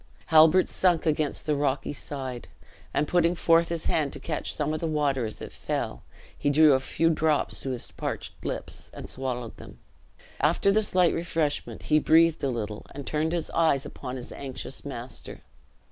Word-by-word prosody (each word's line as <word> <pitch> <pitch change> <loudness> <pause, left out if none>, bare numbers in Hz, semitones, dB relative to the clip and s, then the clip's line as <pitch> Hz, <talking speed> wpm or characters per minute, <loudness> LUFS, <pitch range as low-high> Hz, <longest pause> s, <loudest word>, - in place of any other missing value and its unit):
Halbert 160 +4 +7
sunk 175 -3 +2
against 155 -2 0
the 150 - +1
rocky 140 -1 -1
side, 130 -4 -6 0.4
and 150 - 0
putting 175 +1 +3
forth 165 0 +3
his 170 -1 -3
hand 150 -4 +1
to 140 - -7
catch 155 +2 -2
some 150 0 -1
of 155 - -2
the 165 - -2
water 145 -6 0
as 110 - -7
it - - -7
fell, - - -3 0.4
drew 145 +1 +6
a 130 - +3
few 165 +5 0
drops 155 -2 +1
to 135 - -3
his 125 -2 -4
parched - - -5
lips, - - -4
and - - -7
swallowed 125 -3 -4
them. - - -12 0.6
After 165 +7 +3
this 210 -2 +1
light 180 -2 +5
refreshment, 165 -3 -2
he 155 - +3
breathed 165 +1 +4
a 140 - +2
little 110 -4 -4
and 140 -1 -6
turned 155 +1 0
his 170 -2 -2
eyes 160 -5 +2
upon 125 - -7
his 125 -2 -7
anxious 135 -2 -6
master. - - -7
150 Hz, 175 wpm, -27 LUFS, 135-165 Hz, 0.6 s, Halbert